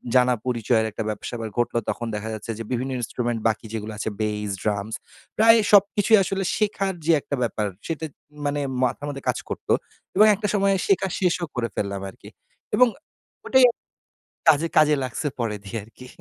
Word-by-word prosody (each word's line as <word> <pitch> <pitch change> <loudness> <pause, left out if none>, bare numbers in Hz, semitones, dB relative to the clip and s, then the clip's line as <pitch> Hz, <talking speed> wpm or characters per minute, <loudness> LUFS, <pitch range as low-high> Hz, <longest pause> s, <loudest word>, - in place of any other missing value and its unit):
জানা 125 0 +5
পরিচয়ের 115 -2 +1
একটা 110 - -4
ব্যাপার 105 -1 -4
স্যাপার 115 -2 -5
ঘটলো। 120 0 +1
তখন 120 - -3
দেখা 110 +2 -4
যাচ্ছে 110 +2 -5
যে, - - -3
বিভিন্ন 130 +2 -1
ইন্সট্রুমেন্ট 120 0 -2
বাকি 110 +1 -1
যেগুলো 110 0 -4
আছে 110 - -2
বেইস, 105 -1 -1
ড্রামস। 105 +1 -1 0.4
প্রায় 225 +1 +7
সবকিছুই 205 +2 +5
আসলে 195 +1 -2
শেখার 200 -2 0
যে 170 - +4
একটা 140 - -3
ব্যাপার, 110 -2 -1 0.2
সেটা 160 -1 -3 0.4
মানে 145 0 0 0.2
মাথার 130 +3 -1
মধ্যে 135 -1 -6
কাজ - - +1
করত। - - -6 0.5
এবং 210 +2 +7
একটা 205 +1 -2
সময় 195 -1 +3
শেখা 195 -1 +3
শেষও 180 -1 +1
করে 120 -1 0
ফেললাম 100 -1 -2
আরকি। - - -14 0.5
এবং 250 0 +6 0.6
ওটাই 260 -1 +6 0.8
কাজে, 155 +2 +4
কাজে 150 -1 +6
লাগছে 130 +4 -3
পরে 110 -3 -1
দিয়ে 105 +3 -5
আরকি। 125 +3 -14
125 Hz, 170 wpm, -24 LUFS, -, 0.8 s, প্রায়